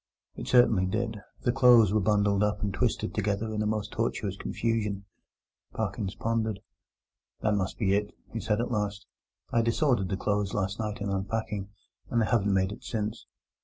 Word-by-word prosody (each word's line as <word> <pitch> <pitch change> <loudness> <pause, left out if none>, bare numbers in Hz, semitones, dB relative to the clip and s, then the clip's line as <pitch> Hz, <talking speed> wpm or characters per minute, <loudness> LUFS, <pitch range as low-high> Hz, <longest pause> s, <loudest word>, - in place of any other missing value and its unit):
It - - -7
certainly 115 -7 +5
did: 110 +2 -2 0.2
the 120 - +3
clothes 120 -5 +6
were 110 - +4
bundled 100 -1 +2
up 105 0 0
and 100 -2 -1
twisted 110 -1 0
together 105 +1 -1
in 105 - -1
a 105 - +1
most 105 -1 -2
tortuous 105 -3 -1
confusion. 105 -2 -2 0.7
Parkins 100 -2 -3
pondered. 110 -3 -1 0.8
"That 105 - +2
must 95 -2 -1
be 100 -4 +2
it," 105 +1 0 0.2
he 115 - -2
said 110 -1 0
at 120 - -1
last: 105 -2 -2 0.5
"I 115 - +3
disordered 115 - +2
the 95 - -1
clothes 100 0 -1
last 100 +1 -1
night 105 0 -3
in 100 - -2
unpacking, 100 +1 -2 0.4
and 120 - +1
they 115 - +3
haven't 105 -3 +2
made 95 0 +2
it - - -9
since. 110 0 -3
105 Hz, 175 wpm, -28 LUFS, 100-115 Hz, 0.8 s, clothes